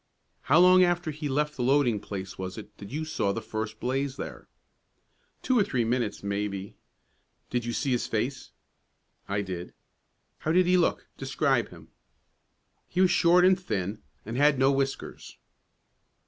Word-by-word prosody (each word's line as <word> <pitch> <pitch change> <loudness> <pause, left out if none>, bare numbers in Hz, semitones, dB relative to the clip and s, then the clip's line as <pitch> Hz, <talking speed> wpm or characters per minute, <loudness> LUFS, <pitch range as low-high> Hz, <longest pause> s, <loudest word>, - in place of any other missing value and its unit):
"How 150 - +6
long 180 +1 +7
after 175 -2 +1
he 150 0 -5
left 150 +2 0
the - - -4
loading 125 -4 +3
place 95 -1 -6
was 95 -1 -6
it 110 - -10
that 100 - -9
you 155 +4 -3
saw 105 -10 -1
the - - -3
first 110 0 -5
blaze 135 +2 -2
there?" - - -7 1.0
"Two 255 -2 +3
or - - +5
three 130 -11 0
minutes, 120 -3 -1
maybe." 100 -1 -3 0.8
"Did 120 -1 -1
you 120 - -2
see 140 +2 -1
his 125 - 0
face?" 125 +4 -3 0.8
"I 100 +1 0
did." 90 -2 -6 0.6
"How 155 - -1
did 180 +1 +5
he 180 +1 +3
look? 175 -2 +1
Describe - - +1
him." - - -14 1.0
"He 180 - -3
was 185 -1 +5
short 180 0 +5
and 185 0 +5
thin, 105 - -3 0.2
and 115 +3 -4
had 145 0 +4
no 135 +1 +4
whiskers." 135 0 -3
130 Hz, 160 wpm, -27 LUFS, 105-155 Hz, 1.0 s, long